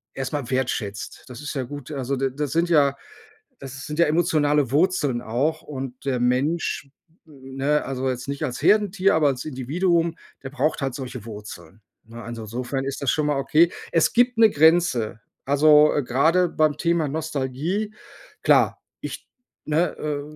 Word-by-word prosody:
erst 135 +1 -4
mal 140 -5 -3
wertschätzt. 120 -6 -3
Das 125 +1 -9
ist 145 - -5
ja 135 - -1
gut. 145 +2 -8
Also, 135 -1 -2
d 135 +1 0
da 150 +1 -1
sind 165 +5 0
ja 140 -4 +3 0.6
das 135 -1 -8
sind 150 +1 -6
ja 170 - +6
emotionale 150 -4 +2
Wurzeln 150 -5 +1
auch 130 +8 -1
und 130 -3 -7
der 130 -3 -1
Mensch- 140 +3 0 0.4
ne, 135 0 -2
also, 130 0 -2
jetzt 125 +1 -5
nicht 140 +2 -3
als 125 -4 -4
Herdentier, 200 -2 +3
aber 155 -2 +3
als 125 -2 -2
Individuum- 165 +5 0 0.3
der 130 - -7
braucht 145 +2 -1
halt 135 -2 -2
solche 125 -4 -7
Wurzeln. 105 -3 -10 0.2
Ne, 115 +1 -11
also, 115 0 -7
insofern 125 +5 -4
ist 135 0 -4
das 135 - +2
schon 150 - 0
mal 145 -2 0
okay. 160 +5 +3 0.2
Es 165 -2 +3
gibt 245 0 +3
'ne 225 -1 +7
Grenze. 155 - +3 0.3
Also, 150 +1 +6
grade 160 +9 +2
beim 155 -3 +1
Thema 170 -3 +1
Nostalgie, 160 +7 -3 0.5
klar, - - +3 0.2
ich - - -7 0.4
ne, 160 +4 0
äh, 150 -1 -3
140 Hz, 165 wpm, -23 LUFS, 130-160 Hz, 0.6 s, ne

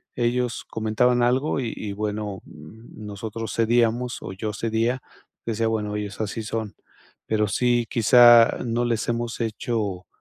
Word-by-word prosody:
ellos 120 0 -1
comentaban 115 +3 +1
algo 130 +6 +1
y 120 -4 -2
y, 105 -2 -5
bueno, 105 -1 -4
nosotros 105 +6 -8
cedíamos 120 +1 +1
o 95 - -6
yo 105 +3 -4
cedía, 115 +4 -1 0.5
decía: 115 0 0
"Bueno, 105 -2 -2
ellos 105 -1 -5
así 110 +1 -3
son". 110 -1 -4 0.5
Pero 105 -1 +1
sí, 120 +3 +1
quizá 120 0 +6
no 120 +1 0
les 115 -3 -1
hemos 120 0 -2
hecho, 110 -4 -3
115 Hz, 135 wpm, -24 LUFS, 105-120 Hz, 0.5 s, quizá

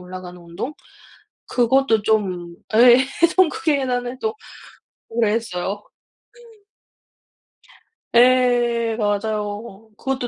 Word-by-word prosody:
올라가는 180 0 -10
운동. 170 - -6 0.8
그것도 245 -2 +2
좀 185 -6 -1 0.2
예 240 +2 +7 0.4
천국의 325 -5 +2
계단을 250 -1 -3
또 440 0 -2 0.8
오래 225 -2 +1
했어요. 205 -2 -3 2.3
예 240 -2 +3
맞아요. 210 0 -3
그것도 265 -2 -3
225 Hz, 175 characters per minute, -21 LUFS, 205-250 Hz, 2.3 s, 예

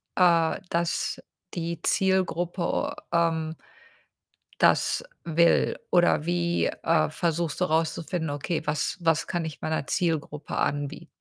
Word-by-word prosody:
äh, 170 -2 +4
dass 170 0 -1 0.3
die 170 -1 -3
Zielgruppe, 185 -2 0 0.2
ähm 165 -1 +1 1.0
das - - +3 0.2
will? 170 +1 +3
Oder 175 -3 +4
wie, 175 0 +1
äh, 165 -1 +1
versuchst 165 0 -1
du 180 - +4
rauszufinden: 160 +1 -1
„Okay, 145 +4 -2
was 150 0 -1
was 165 -2 +2
kann 175 -2 -2
ich 155 - -7
meiner 155 -3 -2
Zielgruppe 155 -4 -2
anbie“ 145 +3 -2
165 Hz, 110 wpm, -26 LUFS, 160-175 Hz, 1.0 s, äh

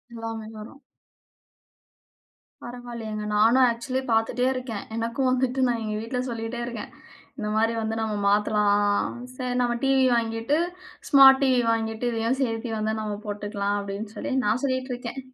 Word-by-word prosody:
எல்லாமே 225 -1 -5
வரும். 275 +7 -11 1.8
பரவாயில்லயேங்க. 235 -3 -6
நானும் 230 +5 +5
ஆக்ஸூலி 240 +3 -1
பார்த்துட்டே 225 +3 +1
இருக்கேன். 250 -5 -5
எனக்கும் 230 +3 0
வந்துட்டு 255 +1 0
நான் 235 -1 0
எங்க 215 0 -3
வீட்ல 235 +3 -3
சொல்லிட்டே 230 +1 -4
இருக்கேன். 235 -3 -6 0.5
இந்தமாரி 220 +1 +1
வந்து 220 0 -2
"நம்ம 215 -1 -1
மாத்தலாம். 205 0 +2 0.2
சரி 250 -1 -3
நம்ம 240 -1 +1
டிவி 270 -1 +4
வாங்கிட்டு 225 +5 0 0.5
ஸ்மார்ட் 270 -1 +8
டிவி 255 -2 +3
வாங்கிட்டு 225 +1 -2
இதையும் 230 +4 0
சேர்த்தி 225 -1 -2
வந்து 220 0 -1
நம்ம 210 -1 -3
போட்டுக்கலாம்." 205 0 -2
அப்டின்னு 200 +2 -6
சொல்லி 280 - -4
நான் 220 +5 +1
சொல்லிட்டு 260 -1 -1
இருக்கேன். 245 +2 -6
230 Hz, 135 wpm, -25 LUFS, 215-250 Hz, 1.8 s, ஸ்மார்ட்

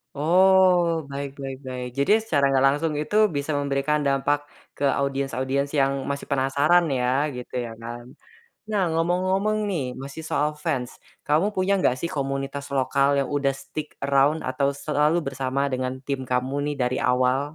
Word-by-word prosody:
Oh, 175 0 +4
baik 140 0 -4
baik 135 -1 -5
baik. 125 -1 -4
Jadi 140 - +2
secara 155 -10 0
nggak 135 0 +3
langsung 150 +3 0
itu 155 - -4 0.2
bisa 140 +2 -2
memberikan 140 +2 0
dampak 140 +1 +1 0.4
ke - - -5 0.2
audiens-audiens 140 0 -1
yang 135 0 +1
masih 140 0 -4
penasaran 140 +6 +3 0.2
ya, 125 - 0 0.3
gitu 125 0 -9
ya 115 - -7
kan. 120 +1 -7 0.6
Nah, 210 -2 -1
ngomong-ngomong 185 +5 +1
nih 140 -10 -2
masih 140 +3 -7
soal 150 -1 -1
fans, 130 -7 -1 0.4
kamu 155 +6 +3
punya 190 0 0
nggak 180 - +2
sih 170 - -2
komunitas 135 0 -3
lokal 140 +1 +2
yang 135 - -3
udah 140 -1 +1
stick 135 +3 -7
around 140 +3 +2
atau 140 +2 0
selalu 150 +3 +1
bersama 135 0 -2
dengan 130 -1 -2
tim 140 0 -3
kamu 125 +1 -1
nih 145 0 -2
dari 125 +1 0
awal? 125 +1 +2
140 Hz, 155 wpm, -24 LUFS, 135-155 Hz, 0.6 s, Oh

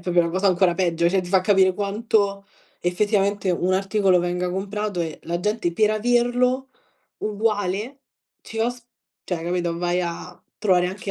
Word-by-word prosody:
proprio 175 -1 +2
na 170 - +1
cosa 190 +4 0
ancora 180 -1 +3
peggio, 170 -2 +1
cioè 190 +1 +1
ti 175 - -8
fa 190 -1 +4
capire 190 -1 +4
quanto 200 0 0 0.3
effettivamente 200 +1 +1
un 180 +1 0
articolo 195 -1 +2
venga 180 +1 -1
comprato 200 +1 -3
e 160 -2 -4
la 170 +1 -3
gente 210 -3 -1
per 210 +5 +3
averlo 245 +3 +1 0.5
uguale, 210 +3 -2 0.4
ci 225 - -8
os 240 +2 0 0.5
cioè 170 -3 -3
capito, 175 -1 -2
vai 175 +1 0
a 175 +1 -6 0.2
trovare 185 -4 +3
anche 195 +1 -6
190 Hz, 155 wpm, -23 LUFS, 180-210 Hz, 0.5 s, fa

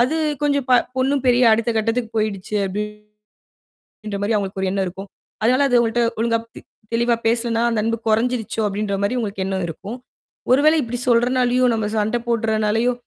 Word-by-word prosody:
அது 255 +6 +2 0.3
கொஞ்சம் 280 -2 +1
ப - - +5 0.2
பொண்ணு 265 +2 +1
பெரிய 245 0 +4
அடுத்த 230 +1 +1
கட்டத்துக்குப் 225 +1 -1
போயிடுச்சு 210 -1 -3
அப்டி 200 +2 -3 1.3
ன்ற 200 - -3
மாரி 210 +3 0
அவங்களுக்கு 195 -1 -2
ஒரு 190 - 0
எண்ணம் 195 -1 0
இருக்கும். 195 +3 -8 0.4
அதனால 255 +5 +3
அது 245 - +2
உங்கள்ட்ட 235 +1 0 0.2
ஒழுங்கா 230 0 +2 0.2
தெ - - -8 0.3
தெளிவா 235 0 +2
பேசலைன்னா, 230 0 +1
அந்த 225 -2 0
அன்பு 230 +1 0
குறைஞ்சிருச்சோ 225 0 0
அப்படின்ற 205 0 -2
மாரி 250 +5 0
உங்களுக்கு 200 -4 -3
எண்ணம் 190 -2 -2
இருக்கும். 200 +8 -7 0.5
ஒருவேளை 305 +4 +5
இப்படி 240 +1 -4
சொல்றனாலயோ, 250 +1 +3
நாம 220 -2 -1
சண்டை 215 +3 0
போடுறனாலயோ 225 +1 +1
230 Hz, 165 wpm, -21 LUFS, 210-245 Hz, 1.3 s, ப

